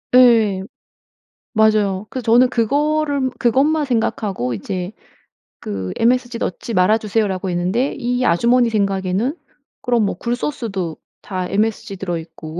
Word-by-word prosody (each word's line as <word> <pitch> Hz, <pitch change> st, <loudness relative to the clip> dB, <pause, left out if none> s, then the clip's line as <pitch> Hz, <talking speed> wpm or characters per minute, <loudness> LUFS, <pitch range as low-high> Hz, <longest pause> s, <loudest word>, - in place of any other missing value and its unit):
예. 225 Hz, -6 st, +5 dB, 0.9 s
맞아요. 215 Hz, -3 st, +2 dB
그래서 255 Hz, -3 st, -5 dB
저는 250 Hz, +1 st, +6 dB
그거를 285 Hz, +3 st, +1 dB
그것만 285 Hz, +6 st, +2 dB
생각하고 210 Hz, -, -1 dB
이제 180 Hz, -, -4 dB, 0.7 s
그 95 Hz, -3 st, -5 dB
"MSG 245 Hz, 0 st, +1 dB
넣지 225 Hz, +4 st, -4 dB
말아주세요."라고 200 Hz, -1 st, +1 dB
했는데 185 Hz, +10 st, 0 dB
이 245 Hz, +1 st, -1 dB
아주머니 235 Hz, +7 st, +3 dB
생각에는 200 Hz, -, 0 dB, 0.4 s
'그럼 240 Hz, -4 st, +1 dB
뭐 -, -, -2 dB
굴소스도 230 Hz, -, -3 dB, 0.2 s
다 185 Hz, -2 st, -4 dB
MSG 210 Hz, 0 st, -1 dB
들어 175 Hz, -3 st, -3 dB
있고 160 Hz, 0 st, -8 dB
220 Hz, 290 characters per minute, -19 LUFS, 185-245 Hz, 0.9 s, 저는